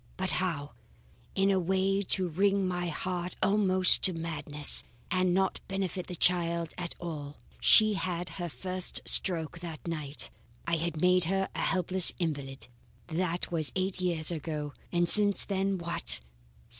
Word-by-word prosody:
But 190 0 -1
how? 160 -6 -3 0.6
In 195 0 +2
a 190 - +1
way 190 +2 0
to 185 -1 0
wring 195 +3 0
my 180 -1 -3
heart 180 +2 -5
almost 190 -2 +4
to 185 - +5
madness, 150 -3 +3 0.3
and 185 -1 +1
not 190 +1 0
benefit 190 -2 -4
the 180 - -6
child 170 -2 +1
at 175 -1 -6
all. 150 -4 -7 0.2
She 215 -1 +6
had 180 -3 -4
her 175 -2 -6
first 185 +7 -4
stroke 165 -3 0
that 165 -2 -9
night. 150 -3 -4 0.3
I 170 0 0
had 165 -1 -4
made 180 +1 +3
her 195 +2 -1
a - - -5
helpless 185 -1 +1
invalid. 140 -6 -4 0.4
"That 175 +1 -3
was 160 -4 -2
eight 185 0 -2
years 170 -3 +1
ago, 150 -2 -5 0.2
and 175 0 +1
since 205 +1 +8
then 195 -1 -2
what? 170 - 0
175 Hz, 150 wpm, -28 LUFS, 165-190 Hz, 0.6 s, since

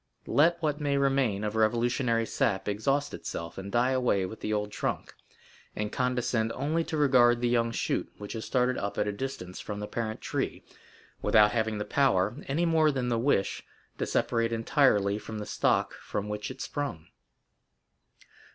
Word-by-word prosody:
Let 170 +4 +3
what 150 -1 0
may 140 -1 +1
remain 135 -7 +1
of 105 0 -2
revolutionary 115 +1 +2
sap 95 -2 0
exhaust 135 +8 0
itself 85 +3 -6
and 100 +1 -7
die 120 +2 +2
away 125 -7 +2
with 105 +4 -8
the 105 - -3
old 105 -1 -1
trunk, - - -3 0.6
and 105 0 -3
condescend 125 -3 0
only 155 +6 0
to 160 - -3
regard 125 -5 +5
the 120 - +1
young 120 -1 +2
shoot - - -2
which 105 -1 -7
has 110 -1 -5
started 125 0 +1
up 100 - -4
at 105 - +1
a - - 0
distance 100 -5 -6
from 105 -1 -5
the 105 - -3
parent 110 0 -4
tree, - - -3 0.6
without 105 -1 +5
having 110 -1 0
the 105 - -3
power, 105 -5 +2
any 160 +6 +1
more 160 -2 +4
than 130 -4 -1
the 115 -1 +1
wish, 115 -6 +1 0.4
to - - -1
separate 115 0 +1
entirely 110 -4 +2
from 110 0 -7
the 105 - -5
stock - - +1
from 105 - -5
which 105 0 -4
it 130 0 -8
sprung." 140 - -4
115 Hz, 175 wpm, -29 LUFS, 105-135 Hz, 0.6 s, regard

